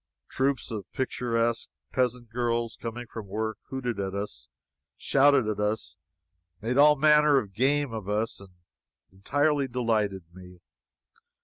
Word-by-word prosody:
Troops 135 -3 -1
of 105 -3 -6
picturesque 120 -3 -1 0.2
peasant 125 -2 -1
girls, 120 -1 -1
coming 120 +1 -5
from 110 -2 -8
work, 110 +2 -3
hooted 125 -5 -3
at 95 0 -3
us, 100 -12 -5 0.5
shouted 140 -3 +4
at 105 -1 -2
us, 105 +1 -2 0.6
made 115 +3 -2
all 150 +1 +7
manner 150 0 +5
of 105 -7 -2
game 135 +3 +1
of 105 -3 -5
us, 110 +2 -1
and 100 -1 -13 0.6
entirely 145 +9 +1
delighted 110 -6 0
me. 90 -1 -13
115 Hz, 130 wpm, -27 LUFS, 105-130 Hz, 0.6 s, all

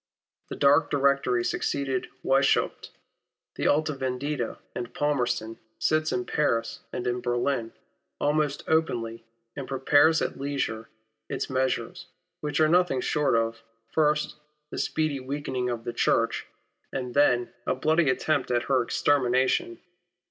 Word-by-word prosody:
The - - -5
dark 145 +1 +4
Directory 140 -3 +2
succeeding 135 -2 -1 0.2
Wieshaupt, 135 +1 +2 0.6
the - - -1
Alta 155 +1 +2
Veiidita, 130 -1 -3 0.2
and 120 -1 -5
Palmerston, 120 -6 -1 0.2
sits 155 0 +1
in 125 0 -1
Paris 115 -6 0
and 125 - -4
in 125 0 -1
Berlin 120 -1 -1 0.5
almost 150 -1 0
openly, 115 -8 0 0.3
and 140 -2 -5
prepares 145 +4 +4
at - - -4
leisure 135 -5 -3 0.4
its - - -3
measures, 130 +7 -1 0.3
which 150 0 -2
are 155 - +5
nothing 175 -4 +3
short 150 0 +1
of, 115 0 0 0.3
first, 150 -1 +1 0.3
the - - -4
speedy 155 -3 0
weakening 130 -2 -3
of 120 -2 -3
the 120 - -4
Church, - - +1 0.4
and 125 -2 -4
then, 145 - +5
I - - +6
am 120 -1 +1
certain, - - -17
a - - +2
bloody 160 -1 +3
attempt 130 +4 0
at 120 -1 +1
her 130 -2 +2
extermination. 130 -2 +1
135 Hz, 140 wpm, -27 LUFS, 120-150 Hz, 0.6 s, I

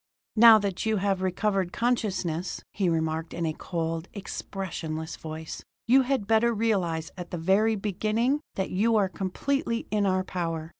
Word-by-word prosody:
"Now 225 0 +9
that 200 -3 -2
you 220 -1 +1
have 195 -1 0
recovered 190 0 0
consciousness," 190 -8 -1
he 190 -3 0
remarked 160 0 -1
in 170 - -1
a 160 - -1
cold, 165 0 -3
expressionless 165 -5 -5
voice, 160 0 -7 0.2
"you 260 +4 +6
had 260 -4 0
better 225 +2 +3
realize 185 -8 0
at 180 -1 -7
the 175 - -4
very 195 +6 +3
beginning 215 +7 0
that 190 - -2
you 225 +5 +2
are 205 -3 +3
completely 230 - -2
in 210 -2 +2
our 185 0 +1
power. 165 -3 -3
190 Hz, 155 wpm, -27 LUFS, 170-220 Hz, 0.2 s, Now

